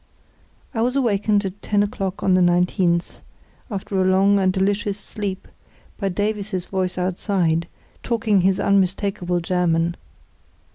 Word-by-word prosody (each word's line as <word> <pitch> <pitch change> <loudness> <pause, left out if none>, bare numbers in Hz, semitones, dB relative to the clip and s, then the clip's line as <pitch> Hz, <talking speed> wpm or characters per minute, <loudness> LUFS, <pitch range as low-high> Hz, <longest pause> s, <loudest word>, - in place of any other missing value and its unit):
I 225 - -1
was 250 +3 +1
awakened 210 -5 +1
at 190 +2 -6
ten 205 -1 +1
o'clock 195 -2 -4
on 190 - +3
the 185 - +4
19th, 175 0 +1 0.5
after 195 -2 -2
a - - +3
long 195 +2 +4
and 190 -1 +3
delicious 200 +1 0
sleep, 200 -2 -5 0.5
by 200 -2 0
Davies's 205 -1 -2
voice 185 -2 -2
outside, 180 -2 0 0.3
talking 220 -4 +1
his 190 +1 +2
unmistakable 190 -2 +1
German. 170 -1 +1
190 Hz, 130 wpm, -22 LUFS, 180-205 Hz, 0.5 s, the